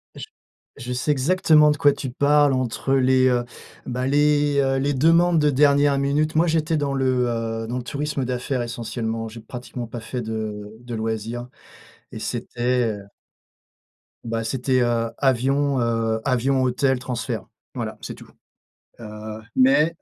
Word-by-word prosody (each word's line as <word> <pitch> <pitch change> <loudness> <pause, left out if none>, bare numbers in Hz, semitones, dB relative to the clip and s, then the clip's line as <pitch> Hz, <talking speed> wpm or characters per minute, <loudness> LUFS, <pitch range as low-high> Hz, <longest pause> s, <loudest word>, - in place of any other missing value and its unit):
J - - -8 0.5
je 125 +1 -5
sais 125 +4 0
exactement 150 +1 +4
de 150 - -1
quoi 145 0 +5
tu 135 - -5
parles, 145 +2 +3
entre 130 +1 -1
les, 130 -1 +4
heu, 125 -1 +2 0.4
bah, 125 +1 -2
les, 145 0 +2
heu, 135 0 +1
les 140 +2 0
demandes 165 +5 +4
de 150 -1 +3
dernière 140 0 +4
minute. 150 +3 0
Moi, 165 +2 +3
j'étais 160 0 +1
dans 145 -2 -1
le, 130 -2 +1
heu, 115 -1 -3
dans 120 +2 -3
le 125 - -4
tourisme 140 +1 -3
d'affaires, 125 +1 -2
essentiellement. 115 -1 -4
J'ai 115 +1 -10
pratiquement 120 +1 -7
pas 120 +1 -7
fait 120 +3 -5
de 110 -1 -5
de 120 -1 -7
loisirs 115 +2 -4 0.6
et - - -6
c'était, 125 0 -1
heu 100 - -12 1.2
bah, 115 -1 -3
c'était, 130 +2 0
heu, 115 -1 0
avion, 135 +1 +1
heu, 115 -1 0
avion, 130 +1 +1
hôtel, 130 +1 +1
transfert. 125 -2 -4 0.3
Voilà, - - -5
c'est - - -7
tout. - - -15 0.7
Heu, 110 -1 -8
mais 140 +5 +4
130 Hz, 155 wpm, -23 LUFS, 115-140 Hz, 1.2 s, quoi